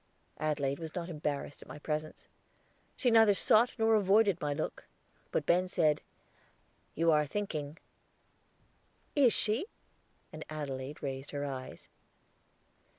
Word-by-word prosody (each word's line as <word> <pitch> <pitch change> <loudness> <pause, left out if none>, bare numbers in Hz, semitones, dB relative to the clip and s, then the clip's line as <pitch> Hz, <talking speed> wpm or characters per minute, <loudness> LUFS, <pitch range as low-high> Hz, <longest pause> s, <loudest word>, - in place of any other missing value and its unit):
Adelaide 145 -2 -1
was 160 -2 -7
not 175 -1 -4
embarrassed 150 -3 -4
at - - -13
my - - -9
presence. 155 +1 -4 0.7
She 245 - +2
neither 225 -3 +6
sought 225 +5 +4
nor 225 -1 +3
avoided 200 -2 +3
my 150 - -1
look. 145 +2 -4 0.4
But - - -1
Ben 180 +2 +3
said, 155 -4 +2 0.9
"You 165 +1 +3
are 150 -1 +3
thinking." 155 -5 -4 1.4
"Is 270 -5 +5
she?" 225 - +2 0.7
And 155 0 -7
Adelaide 145 -2 -6
raised 135 0 -4
her 145 0 -3
eyes. 130 -2 -7
155 Hz, 125 wpm, -32 LUFS, 145-205 Hz, 1.4 s, neither